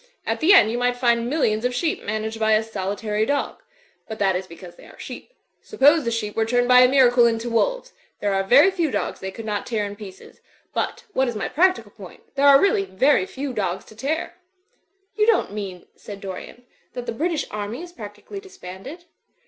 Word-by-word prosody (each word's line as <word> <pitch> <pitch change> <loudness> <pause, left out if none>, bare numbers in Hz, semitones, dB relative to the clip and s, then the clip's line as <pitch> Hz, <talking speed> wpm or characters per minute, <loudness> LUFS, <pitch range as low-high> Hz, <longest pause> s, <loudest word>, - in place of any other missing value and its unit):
At - - -2
the 325 +5 +4
end 225 - +7
you 240 - -2
might 245 0 0
find 235 -1 +1
millions 225 -7 0
of 250 0 -1
sheep 320 +5 -1
managed 220 +1 -4
by 220 0 +3
a 215 +1 +3
solitary 210 0 -3
dog. 285 +5 -2 0.5
But 220 - -6
that 195 -2 +1
is 185 +1 -4
because 175 +1 -12
they - - -16
are - - -16
sheep. - - -9 0.3
Suppose 300 - +3
the - - +1
sheep 220 -3 -3
were 225 - +2
turned 245 +2 +1
by 250 0 +7
a 250 - +7
miracle 250 -3 +5
into 230 +1 -2
wolves. - - 0 0.3
There 205 -1 0
are 195 - +1
very 280 - +6
few 340 -5 -1
dogs - - -3
they 190 - -5
could 220 +4 -9
not 210 -2 -3
tear 220 -3 -1
in 205 0 -6
pieces. 200 -3 -13 0.3
But, 470 - -3
what 265 -4 +1
is 240 - -3
my 210 - -2
practical 370 +4 +1
point, - - -14
there 280 +1 +3
arc 275 -1 +8
really 290 - +2
very 190 +2 +2
few 270 0 -5
dogs 190 -4 -3
to 215 - -16
tear." 290 +9 -3 0.8
"You 425 0 +2
don't 455 - +2
mean," 195 -4 -6
said 205 -1 -10
Dorian, 195 +5 -9 0.3
'*that 245 -1 -6
the - - -3
British 320 +6 -1
Army 210 +8 -5
is 350 -1 -11
practically 215 - -9
disbanded?" 340 - -11
235 Hz, 210 wpm, -22 LUFS, 205-285 Hz, 0.8 s, arc